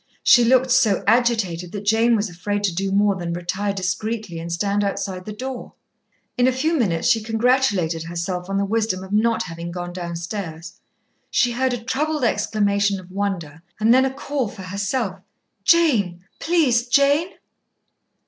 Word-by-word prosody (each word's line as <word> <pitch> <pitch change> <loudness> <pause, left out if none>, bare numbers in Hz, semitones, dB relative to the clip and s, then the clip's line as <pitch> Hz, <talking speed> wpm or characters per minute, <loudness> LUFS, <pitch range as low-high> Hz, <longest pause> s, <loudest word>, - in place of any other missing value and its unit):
She 245 - +6
looked 255 +2 +3
so 245 -6 +3
agitated 215 -7 +1
that 205 -1 -6
Jane 225 +3 +3
was 215 0 0
afraid 205 +3 -3
to 190 -4 +1
do 195 +3 -2
more 200 0 +3
than 175 -2 -4
retire 185 +4 -2
discreetly 195 0 -3
and 170 +1 -6
stand 200 +4 0
outside 190 -2 -3
the 215 - -6
door. 255 +3 -6 0.7
In 245 - +5
a - - +4
few 290 +6 0
minutes 185 - 0
she 225 - +3
congratulated 220 -7 +1
herself 175 +2 -4
on 195 - -1
the 200 - +1
wisdom 210 -3 -1
of 190 - -10
not 225 +2 +2
having 170 -1 -7
gone 175 0 -6
downstairs. 170 -1 -6 0.6
She 245 -2 +2
heard 255 +1 0
a 240 -2 -5
troubled 300 +4 -1
exclamation 205 -3 +1
of 185 0 -14
wonder, 185 -6 -3 0.2
and 220 +2 +4
then 260 +1 +5
a 265 - -1
call 275 -2 -3
for 200 -1 -9
herself. 200 +2 -2 0.5
"Jane, 220 - +3 0.2
please, 275 -8 +2
Jane!" 285 +6 +3
205 Hz, 165 wpm, -22 LUFS, 180-245 Hz, 0.7 s, She